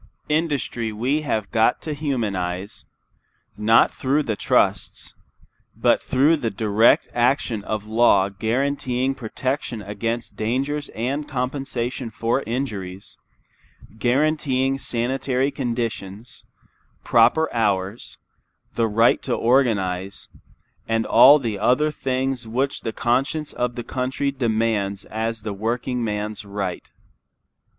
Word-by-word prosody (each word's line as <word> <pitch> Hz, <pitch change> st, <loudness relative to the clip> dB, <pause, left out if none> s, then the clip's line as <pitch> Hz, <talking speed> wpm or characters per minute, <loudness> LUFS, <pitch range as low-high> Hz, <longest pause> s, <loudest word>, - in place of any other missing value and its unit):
Industry 145 Hz, -7 st, -1 dB
we 125 Hz, +8 st, 0 dB
have 110 Hz, -8 st, -2 dB
got 110 Hz, +1 st, +3 dB
to 155 Hz, -, -3 dB
humanize, 100 Hz, -, -3 dB, 0.7 s
not 110 Hz, +2 st, +4 dB
through 140 Hz, +3 st, 0 dB
the 110 Hz, -5 st, -2 dB
trusts, -, -, 0 dB, 0.6 s
but -, -, +3 dB
through 145 Hz, +5 st, +3 dB
the 120 Hz, -6 st, -2 dB
direct 110 Hz, +1 st, +3 dB
action 120 Hz, -3 st, +1 dB
of 105 Hz, 0 st, -3 dB
law 110 Hz, -3 st, +4 dB
guaranteeing 125 Hz, +5 st, -1 dB
protection 130 Hz, 0 st, -3 dB
against 115 Hz, +4 st, -4 dB
dangers 135 Hz, +7 st, -2 dB
and 135 Hz, +6 st, -2 dB
compensation 125 Hz, -2 st, -3 dB
for 115 Hz, +4 st, -1 dB
injuries, 100 Hz, -7 st, -4 dB, 0.8 s
guaranteeing 135 Hz, 0 st, +1 dB
sanitary 130 Hz, +2 st, -1 dB
conditions, 115 Hz, -5 st, -4 dB, 0.6 s
proper 120 Hz, +8 st, +4 dB
hours, 100 Hz, -2 st, -1 dB, 0.6 s
the 115 Hz, -1 st, +1 dB
right 115 Hz, +2 st, +3 dB
to -, -, -1 dB
organize, 100 Hz, -7 st, 0 dB, 0.6 s
and 115 Hz, -1 st, 0 dB
all 145 Hz, +3 st, +8 dB
the 115 Hz, -8 st, -3 dB
other 135 Hz, +8 st, +2 dB
things 130 Hz, -3 st, -2 dB
which 130 Hz, +5 st, -1 dB
the 115 Hz, -, -3 dB
conscience 135 Hz, +7 st, -1 dB
of 120 Hz, -1 st, -2 dB
the 120 Hz, -, -4 dB
country 130 Hz, +3 st, -2 dB
demands 110 Hz, -6 st, -1 dB
as 110 Hz, 0 st, -3 dB
the 105 Hz, -2 st, -3 dB
workingman's 110 Hz, -1 st, -2 dB
right. 100 Hz, -3 st, -5 dB
120 Hz, 110 wpm, -22 LUFS, 110-135 Hz, 0.8 s, all